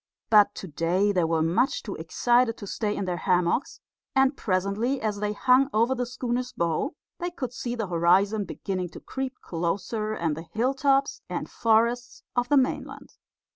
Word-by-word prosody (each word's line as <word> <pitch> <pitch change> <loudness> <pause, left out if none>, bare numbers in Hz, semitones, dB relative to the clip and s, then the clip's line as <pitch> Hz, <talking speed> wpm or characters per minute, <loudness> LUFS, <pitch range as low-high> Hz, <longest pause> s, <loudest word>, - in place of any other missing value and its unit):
But 205 -1 +6
to 190 - -7
day 175 +6 +1
they 180 -4 +2
were 160 -1 +1
much 215 - +1
too 205 - -5
excited 240 +8 +1
to 205 - -8
stay 210 +1 -2
in 200 - -2
their 180 -1 -2
hammocks; 180 +6 0 0.4
and 270 +1 +4
presently, 200 +7 0
as 215 -4 -2
they 210 0 -1
hung 255 +5 +4
over 230 +4 +3
the 250 -1 -2
schooner's 245 0 -3
bow, 170 - -1 0.2
they 350 0 -2
could 265 -8 -5
see 240 0 -4
the 225 -3 -2
horizon 190 +4 +2
beginning 185 -3 -4
to - - -8
creep 265 -1 -5
closer, 195 +6 -2
and 165 -7 -1
the 160 - -6
hill 245 +5 +1
tops 275 0 +1
and - - -4
forests 235 +2 +1
of 245 0 0
the 290 - +5
mainland. 265 0 -1
215 Hz, 175 wpm, -26 LUFS, 185-250 Hz, 0.4 s, But